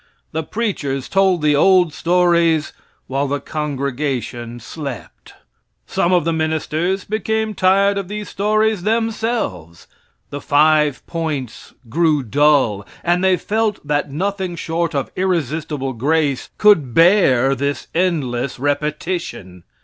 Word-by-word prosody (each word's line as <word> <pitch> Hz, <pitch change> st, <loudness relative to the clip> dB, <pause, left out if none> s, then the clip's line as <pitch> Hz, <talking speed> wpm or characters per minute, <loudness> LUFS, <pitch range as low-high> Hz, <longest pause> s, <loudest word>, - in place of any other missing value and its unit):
The 160 Hz, -, -2 dB
preachers 155 Hz, -, -3 dB
told 190 Hz, -4 st, +2 dB
the 150 Hz, -1 st, +3 dB
old 180 Hz, 0 st, +4 dB
stories 170 Hz, -2 st, +2 dB, 0.3 s
while 135 Hz, +2 st, -1 dB
the 145 Hz, +1 st, -1 dB
congregation 135 Hz, -5 st, -3 dB
slept. 140 Hz, +1 st, -8 dB, 0.5 s
Some 175 Hz, -, 0 dB
of 175 Hz, -4 st, +3 dB
the 165 Hz, -, +1 dB
ministers 160 Hz, +4 st, -1 dB
became 220 Hz, 0 st, -1 dB
tired 200 Hz, +1 st, +3 dB
of 195 Hz, -, -5 dB
these 210 Hz, +1 st, -5 dB
stories 215 Hz, 0 st, +1 dB
themselves. 220 Hz, -, -2 dB, 0.5 s
The 145 Hz, -, -5 dB
five 150 Hz, -1 st, +2 dB
points 150 Hz, -8 st, -5 dB
grew 155 Hz, +2 st, +1 dB
dull, 135 Hz, -5 st, +2 dB, 0.2 s
and 175 Hz, +1 st, +1 dB
they 190 Hz, -1 st, +4 dB
felt 215 Hz, -3 st, -1 dB
that 145 Hz, 0 st, -1 dB
nothing 190 Hz, +3 st, -2 dB
short 170 Hz, -1 st, -2 dB
of 140 Hz, -, -2 dB
irresistible 155 Hz, -6 st, -2 dB
grace 140 Hz, +2 st, 0 dB
could 165 Hz, -, +4 dB
bear 165 Hz, -8 st, +5 dB
this 140 Hz, +2 st, -3 dB
endless 140 Hz, -8 st, -1 dB
repetition. 145 Hz, -, -3 dB
160 Hz, 120 wpm, -19 LUFS, 140-185 Hz, 0.5 s, bear